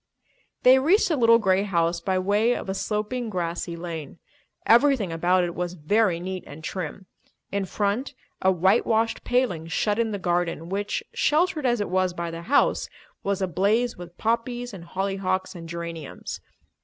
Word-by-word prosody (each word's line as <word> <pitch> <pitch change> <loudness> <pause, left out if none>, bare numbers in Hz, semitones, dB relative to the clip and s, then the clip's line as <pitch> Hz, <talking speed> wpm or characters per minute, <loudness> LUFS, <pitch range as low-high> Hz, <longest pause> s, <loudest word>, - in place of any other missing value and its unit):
They 260 +1 +7
reached 350 +11 +3
the 320 - +2
little 230 -3 +6
grey 190 -3 +2
house 170 -4 +1
by 190 +2 0
way 205 +6 +2
of - - -5
a - - 0
sloping, 215 +4 -2
grassy 170 -2 -3
lane. 165 -3 -6 0.5
Everything 240 -5 +4
about 180 +3 +2
it 175 -1 -2
was 175 0 -3
very 185 +2 +2
neat 185 +1 -5
and 150 +2 -10
trim. 185 +2 -5 0.5
In 200 -1 -1
front 205 +7 -1 0.3
a 190 - +4
white 190 +5 +3
washed 225 0 +1
paling 225 -11 0
shut 205 +5 0
in 230 -1 +1
the 205 - -2
garden 175 -2 -1
which, 205 +2 -2
sheltered 310 -2 +2
as 240 -2 +2
it 205 - -2
was 185 -1 +1
by 170 -1 -3
the 165 0 -6
house, 265 +11 +2 0.3
was 195 -1 -1
ablaze 200 +7 +1
with 175 0 -11
poppies 240 +1 -1
and 175 -3 -9
hollyhocks 190 0 -2
and 165 -2 -9
geraniums. 170 -3 -6
190 Hz, 170 wpm, -25 LUFS, 175-230 Hz, 0.5 s, They